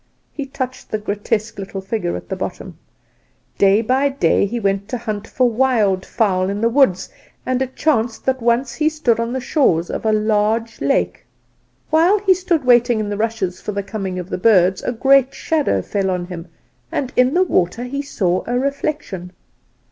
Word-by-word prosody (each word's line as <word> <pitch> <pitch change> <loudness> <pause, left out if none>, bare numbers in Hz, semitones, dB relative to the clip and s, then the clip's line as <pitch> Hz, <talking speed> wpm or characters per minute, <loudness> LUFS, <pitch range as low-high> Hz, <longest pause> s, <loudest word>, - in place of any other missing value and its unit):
(He 285 -2 -5
touched 260 -1 -5
the 215 - -1
grotesque 210 +1 -3
little 195 0 -5
figure 190 -2 -3
at - - -7
the - - -2
bottom.) - - -6 0.8
"Day 200 +3 +4
by 265 +5 +2
day 270 -6 +2
he 235 +4 -3
went 200 -1 -1
to 250 - -2
hunt 215 -3 -5
for 255 -1 +2
wild 220 -6 +1
fowl 190 -5 +1
in 200 +1 -3
the 230 - +3
woods; 235 -8 +3 0.4
and 255 0 0
it 260 0 -3
chanced 235 -7 0
that 260 -1 0
once 235 +2 +1
he 310 0 +1
stood 280 -8 0
on 230 0 -1
the 260 - -2
shores 245 - +1
of - - -4
a 220 - +2
large 215 +1 0
lake. 90 -10 0 0.7
While 335 +6 +4
he 390 -2 +3
stood 355 -6 -1
waiting 240 -2 +4
in 210 -1 -2
the 205 - -2
rushes 220 -5 -2
for 210 - -4
the 200 0 -2
coming 195 -2 -4
of 180 -1 -5
the - - -2
birds, 185 -3 +4
a - - -2
great 270 +2 +3
shadow 315 -3 0
fell 195 -2 -1
on 180 -1 -2
him, 175 -1 -8 0.4
and 260 -2 -3
in 250 +4 +3
the 365 - +5
water 205 - 0
he 275 +3 -3
saw 185 -10 -1
a 245 +1 0
reflection. 270 - -3
230 Hz, 190 wpm, -19 LUFS, 195-260 Hz, 0.8 s, the